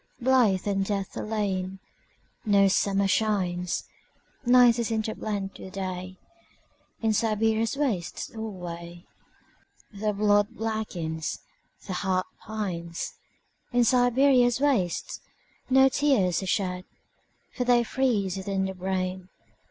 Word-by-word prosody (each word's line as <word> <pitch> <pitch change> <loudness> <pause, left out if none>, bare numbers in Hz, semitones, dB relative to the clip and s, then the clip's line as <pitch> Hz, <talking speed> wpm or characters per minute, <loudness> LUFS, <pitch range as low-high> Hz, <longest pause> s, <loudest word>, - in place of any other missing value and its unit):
Blight 240 -7 +3
and 195 -1 +1
death 195 0 -3
alone.No 200 0 -2
summer 195 +1 +2
shines. 185 -4 0 0.6
Night 245 -1 +6
is 235 - -1
interblent 215 -3 -3
with 190 - -9
Day.In 190 - -6
Siberia's 225 +2 +1
wastes 230 -13 -2
alwayThe 175 -6 -7 1.1
blood 205 0 +4
blackens, 180 -9 -3 0.4
the 190 - -4
heart 185 0 0
pines.In 200 +4 -4
Siberia's 245 0 +4
wastesNo 265 +2 0
tears 255 - +2
are 190 - -5
shed, 185 -1 -1 0.7
For 250 - 0
they 245 -1 +4
freeze 220 -7 0
within 190 0 -1
the 190 - -3
brain. 185 0 -3
205 Hz, 90 wpm, -27 LUFS, 185-230 Hz, 1.1 s, Night